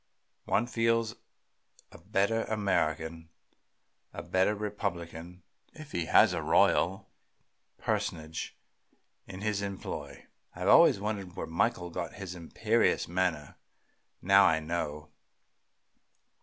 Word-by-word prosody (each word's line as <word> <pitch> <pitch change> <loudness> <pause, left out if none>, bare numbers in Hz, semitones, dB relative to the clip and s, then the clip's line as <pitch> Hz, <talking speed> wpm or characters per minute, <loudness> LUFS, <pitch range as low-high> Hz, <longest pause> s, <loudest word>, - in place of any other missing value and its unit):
One 120 - +1
feels 115 -1 +1 0.8
a - - -13
better 100 +4 0
American, 80 -6 -1 0.8
a - - -6
better 95 +3 +1
Republican, 90 -4 -5 0.3
if 155 -2 -11
he 85 -2 -2
has - - +5
a - - -2
royal 95 +3 +2 0.7
personage 80 0 -3 0.7
in 95 0 -9
his 105 -1 -1
employ. 85 -8 -6 0.3
I - - -6
always - - +6
wondered 100 -3 -4
where - - -4
Michael 90 +1 -1
got 85 0 -4
his 95 -2 -7
imperious 85 -2 0
manner; 85 -5 -2 0.7
now 100 +1 +6
I 80 -1 +3
know. 75 -2 -4
95 Hz, 105 wpm, -30 LUFS, 80-105 Hz, 0.8 s, always